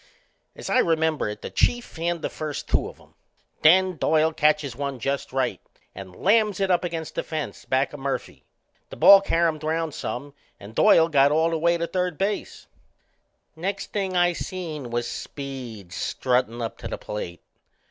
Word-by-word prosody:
As - - -8
I 255 - +3
remember 160 - +1
it 105 - -8
the - - -6
Chief 240 0 +1
fanned 170 0 -3
the - - -1
first 155 -2 -5
two - - +1
of - - -15
'em. - - -22 0.5
Then 185 +2 +5
Doyle 160 +2 +2
catches 150 -4 +1
one 140 0 -3
just 135 +3 -3
right 130 -7 -1 0.3
and 95 -2 -10
lams 210 0 +2
it 195 -1 +1
up 180 - +2
against 165 -2 -4
the - - -1
fence 155 -2 -5
back 130 +2 0
o' - - -6
Murphy. 135 0 -4 0.5
The - - -8
ball 200 0 +8
caromed 165 -5 +1
round 160 0 -1
some 140 +5 -5 0.3
and 100 +2 -11
Doyle 160 +7 +5
got 140 -3 +4
all 160 +2 +2
the 165 - -1
way 170 +1 +3
to 170 - -1
third 180 -2 -2
base. 200 +2 -3 0.9
Next 195 +4 -4
thing 190 -3 -1
I 175 0 +4
seen 160 -8 -5
was 120 0 -2
Speed 125 -7 -7
struttin' 125 -2 -1
up 115 - -5
to - - -6
the - - -4
plate. 85 -5 -6
155 Hz, 180 wpm, -24 LUFS, 135-175 Hz, 0.9 s, ball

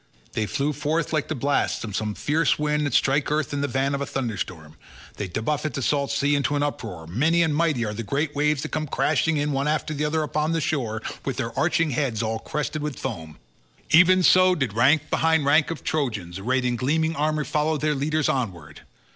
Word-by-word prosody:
They 110 -1 -2
flew 145 +6 -1
forth 150 +3 -1
like 155 -2 0
the 155 - -3
blasts 140 +2 0
of 105 -4 -5
some 105 -1 -2
fierce 160 +3 +1
wind 150 0 0
that 130 - -2
strike 135 +1 +2
earth 150 -1 0
in 140 - -1
the 145 - 0
van 135 +1 0
of 140 - -2
a 140 - -2
thunderstorm—they 95 - -6
buffet 140 - -2
the 140 - -2
salt 140 0 +1
sea 140 +1 +1
into 145 0 +1
an 145 - +1
uproar; 110 - -4
many 155 - +2
and 155 -3 0
mighty 150 -7 +1
are 105 - -3
the 105 - -4
great 140 +7 -2
waves 150 0 +1
that - - -4
come 155 0 -2
crashing 155 +4 +1
in 145 0 0
one 140 +1 0
after 155 0 -1
the 150 0 -2
other 155 +1 0
upon 155 +1 -1
the 165 - +1
shore 120 -8 -2 0.2
with - - -3
their - - -3
arching 165 -2 +1
heads 120 -4 -1
all 110 0 -2
crested 150 +3 -3
with 150 -2 -4
foam—even 120 - 0
so 185 +1 +6
did 135 - -2
rank 140 +7 +3
behind 160 -2 +2
rank 145 +2 +4
of 165 - -5
Trojans 110 - -2
arrayed 130 +5 0
in 120 -1 0
gleaming 160 +6 0
armour 155 0 0
follow 155 +2 0
their 150 +1 0
leaders 150 +2 0
onward. 90 - -3
145 Hz, 210 wpm, -24 LUFS, 120-155 Hz, 0.2 s, so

